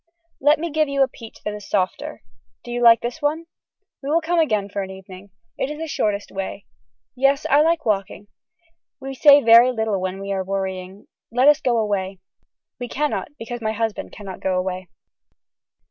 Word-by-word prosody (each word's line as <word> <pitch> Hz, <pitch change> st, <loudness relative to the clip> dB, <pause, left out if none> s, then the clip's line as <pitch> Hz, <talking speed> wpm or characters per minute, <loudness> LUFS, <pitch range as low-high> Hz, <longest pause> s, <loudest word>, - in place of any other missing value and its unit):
Let 295 Hz, +3 st, +4 dB
me 335 Hz, +1 st, -4 dB
give 310 Hz, 0 st, +1 dB
you 275 Hz, -1 st, +3 dB
a -, -, +2 dB
peach 230 Hz, -3 st, -13 dB
that 210 Hz, -, -2 dB
is 210 Hz, -1 st, -9 dB
softer. 185 Hz, -, -2 dB, 0.4 s
Do 240 Hz, -, -8 dB
you 245 Hz, 0 st, -2 dB
like 230 Hz, -1 st, +7 dB
this 245 Hz, +7 st, -5 dB
one. 305 Hz, +3 st, -1 dB, 0.6 s
We 275 Hz, -, -5 dB
will 320 Hz, +3 st, +3 dB
come 335 Hz, +1 st, 0 dB
again 215 Hz, -11 st, +1 dB
for 200 Hz, 0 st, -4 dB
an 190 Hz, -, -5 dB
evening. 190 Hz, +1 st, -11 dB, 0.3 s
This -, -, -1 dB
is 300 Hz, -, -5 dB
the 325 Hz, +1 st, -5 dB
shortest 210 Hz, -8 st, -2 dB
way. 195 Hz, 0 st, -5 dB, 0.5 s
Yes 275 Hz, +3 st, +2 dB
I 290 Hz, +2 st, +6 dB
like 330 Hz, +1 st, +1 dB
walking. 205 Hz, -1 st, -1 dB, 0.7 s
We 270 Hz, 0 st, -6 dB
say 285 Hz, +1 st, +7 dB
very 230 Hz, +2 st, +7 dB
little 220 Hz, -5 st, -1 dB
when 185 Hz, +1 st, -3 dB
we 195 Hz, 0 st, -5 dB
are 190 Hz, -1 st, -1 dB
worrying. 190 Hz, 0 st, -4 dB, 0.3 s
Let 250 Hz, +4 st, +3 dB
us 295 Hz, -1 st, +6 dB
go 240 Hz, -2 st, +1 dB
away. 195 Hz, -3 st, -1 dB, 0.6 s
We 245 Hz, -, -4 dB
cannot 295 Hz, +4 st, -2 dB
because 235 Hz, +1 st, -6 dB
my 220 Hz, -1 st, -1 dB
husband 225 Hz, -1 st, -3 dB
cannot 195 Hz, -3 st, -9 dB
go 185 Hz, -1 st, -1 dB
away. 185 Hz, -1 st, -3 dB
225 Hz, 190 wpm, -22 LUFS, 195-275 Hz, 0.7 s, like